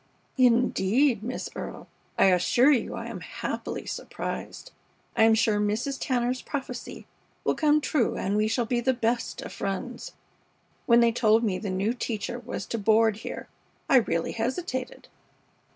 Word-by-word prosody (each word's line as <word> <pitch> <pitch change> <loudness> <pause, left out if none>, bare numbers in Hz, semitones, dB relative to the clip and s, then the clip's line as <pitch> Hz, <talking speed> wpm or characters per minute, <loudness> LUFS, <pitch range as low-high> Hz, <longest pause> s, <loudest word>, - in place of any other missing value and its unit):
"Indeed, 245 0 +3
Miss 245 +4 -4
Earle, - - -7 0.3
I - - +5
assure 240 +10 +4
you 265 - +1
I - - -5
am - - -6
happily - - -5
surprised. - - -6 0.4
I 220 - +5
am 225 0 +5
sure 215 -1 +2
Mrs. 220 +7 -1
Tanner's 250 0 0
prophecy 265 -4 -6 0.4
will - - +2
come 305 -1 +3
true 290 -4 0
and 195 +2 -1
we 215 +1 +2
shall 235 +2 0
be 240 +1 0
the 260 +1 +1
best 235 0 -1
of - - -8
friends. 235 +5 -4 0.7
When 235 0 +6
they 235 0 +5
told 225 0 +3
me 195 -5 0
the 205 - -4
new 195 +5 0
teacher 240 0 -4
was 240 - -6
to 230 - -3
board 220 0 +3
here - - -7 0.4
I 270 - +6
really 170 -8 +1
hesitated. 255 +2 -3
235 Hz, 155 wpm, -27 LUFS, 215-255 Hz, 0.7 s, When